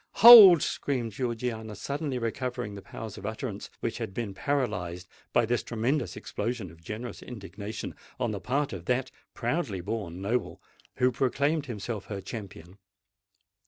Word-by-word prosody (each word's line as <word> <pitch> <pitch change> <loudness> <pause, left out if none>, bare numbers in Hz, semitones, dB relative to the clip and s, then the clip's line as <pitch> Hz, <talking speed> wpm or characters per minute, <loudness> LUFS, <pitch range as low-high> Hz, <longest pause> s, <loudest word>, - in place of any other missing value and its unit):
hold!" 205 -8 +11
screamed 125 -5 -2
Georgiana, 115 -1 -3
suddenly 140 +4 -3
recovering 115 -2 -3
the 100 - -8
powers 110 +2 -8
of - - -9
utterance - - -5
which - - -3
had 95 - -5
been 110 -5 -3
paralyzed 95 -9 -2 0.2
by 120 - +3
this 120 +2 0
tremendous 120 +3 -1
explosion 110 -4 -4
of 85 0 -17
generous 110 +8 -6
indignation 105 -1 -7 0.3
on - - 0
the - - -4
part 140 +1 -1
of 90 -3 -7
that 125 +3 0 0.2
proudly 120 - -1
born 95 -2 -4
noble 95 -4 -2 0.4
who 125 0 +3
proclaimed 140 +5 0
himself 110 -2 -5
her 100 -2 -5
champion. 95 -3 -9
115 Hz, 145 wpm, -28 LUFS, 100-130 Hz, 0.4 s, hold